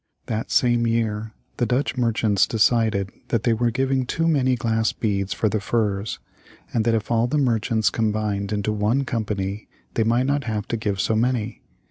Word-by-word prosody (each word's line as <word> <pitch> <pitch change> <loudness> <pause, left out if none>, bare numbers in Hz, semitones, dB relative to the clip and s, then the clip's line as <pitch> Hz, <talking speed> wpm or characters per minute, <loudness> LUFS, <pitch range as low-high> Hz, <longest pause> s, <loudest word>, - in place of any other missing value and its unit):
That 110 0 -3
same 120 -1 +3
year 110 -1 -1 0.3
the 120 - +1
Dutch 130 +3 0
merchants 115 -5 +2
decided 110 -3 +2 0.2
that 115 -2 0
they 120 - +3
were 120 +1 +1
giving 130 +1 0
too 165 +4 0
many 130 -5 +3
glass 115 -1 0
beads 100 -3 -1
for 110 - 0
the 110 +1 0
furs, 105 -1 -1 0.6
and 115 -2 +1
that 115 -1 +3
if 110 0 -3
all 115 +1 +3
the 150 - 0
merchants 115 -4 +1
combined 105 -2 -1
into 105 0 -1
one 105 +6 +1
company 105 -4 -3 0.3
they 115 - +2
might 120 +3 +2
not 140 0 0
have 105 -3 -3
to - - 0
give 105 -3 -2
so 110 - +1
many. 120 0 0
115 Hz, 180 wpm, -23 LUFS, 105-120 Hz, 0.6 s, same